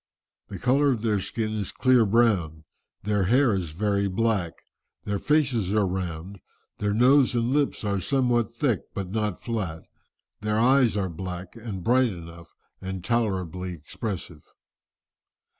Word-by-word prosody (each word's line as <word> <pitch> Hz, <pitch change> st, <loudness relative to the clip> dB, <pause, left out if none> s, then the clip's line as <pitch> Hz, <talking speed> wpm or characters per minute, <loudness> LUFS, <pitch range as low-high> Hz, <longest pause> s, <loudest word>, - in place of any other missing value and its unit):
"The -, -, -7 dB
colour 135 Hz, +4 st, +3 dB
of 120 Hz, -5 st, -1 dB
their 105 Hz, -3 st, +1 dB
skin 110 Hz, +3 st, -3 dB
is 105 Hz, -3 st, -3 dB
clear 125 Hz, -4 st, +3 dB
brown, 95 Hz, -9 st, +2 dB, 0.4 s
their 105 Hz, -1 st, +1 dB
hair 125 Hz, +3 st, +4 dB
is 90 Hz, -4 st, -2 dB
very 100 Hz, +2 st, 0 dB
black, 100 Hz, -4 st, 0 dB, 0.5 s
their 100 Hz, -1 st, -2 dB
faces 125 Hz, -10 st, +1 dB
are 105 Hz, -2 st, +3 dB
round, 90 Hz, 0 st, -4 dB, 0.4 s
their 105 Hz, 0 st, 0 dB
nose 125 Hz, +2 st, +5 dB
and 120 Hz, +1 st, +1 dB
lips 145 Hz, -3 st, 0 dB
are 100 Hz, -2 st, -1 dB
somewhat 120 Hz, -1 st, +1 dB
thick 115 Hz, -2 st, 0 dB, 0.2 s
but 95 Hz, -2 st, -4 dB
not 105 Hz, -3 st, -1 dB
flat, 95 Hz, -9 st, -4 dB, 0.6 s
their 105 Hz, 0 st, -1 dB
eyes 125 Hz, -1 st, +4 dB
are 95 Hz, -2 st, 0 dB
black 90 Hz, +2 st, -7 dB
and 110 Hz, -6 st, -6 dB
bright 125 Hz, +3 st, +3 dB
enough, 85 Hz, -1 st, -11 dB, 0.3 s
and 95 Hz, -1 st, -5 dB
tolerably 95 Hz, -6 st, -1 dB
expressive. 85 Hz, 0 st, -6 dB
105 Hz, 140 wpm, -26 LUFS, 95-120 Hz, 0.6 s, nose